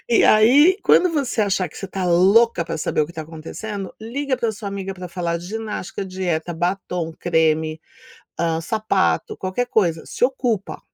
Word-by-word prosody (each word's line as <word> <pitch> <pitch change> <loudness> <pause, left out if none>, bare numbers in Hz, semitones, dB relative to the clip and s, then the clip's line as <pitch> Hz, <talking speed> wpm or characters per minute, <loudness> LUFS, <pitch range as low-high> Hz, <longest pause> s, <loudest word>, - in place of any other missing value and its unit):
e 235 - +4
aí 275 +12 +6
quando 360 - +5
você 275 -7 -1
achar 190 -3 0
que - - -16
você 195 - -5
está 190 0 -4
louca 185 +2 +4
para 165 - -4
saber - - 0
o 150 - +2
que 170 - -12
tá 160 -2 -5
acontecendo, 180 +5 -7
liga 260 +4 -2
pra 230 -3 -1
sua 205 -1 -6
amiga 195 -1 -5
para 180 -1 -8
falar 170 -1 -2
de 175 - -10
ginástica, 210 -2 -5
dieta, 180 -3 -3
batom, 175 -1 -2
creme, 160 -2 +1 0.6
ah, 165 -1 0
sapato, 210 +1 0
qualquer 190 +6 -2
coisa, 175 -9 +1
se - - 0
ocupa. 245 -6 -1
190 Hz, 175 wpm, -21 LUFS, 170-220 Hz, 0.6 s, aí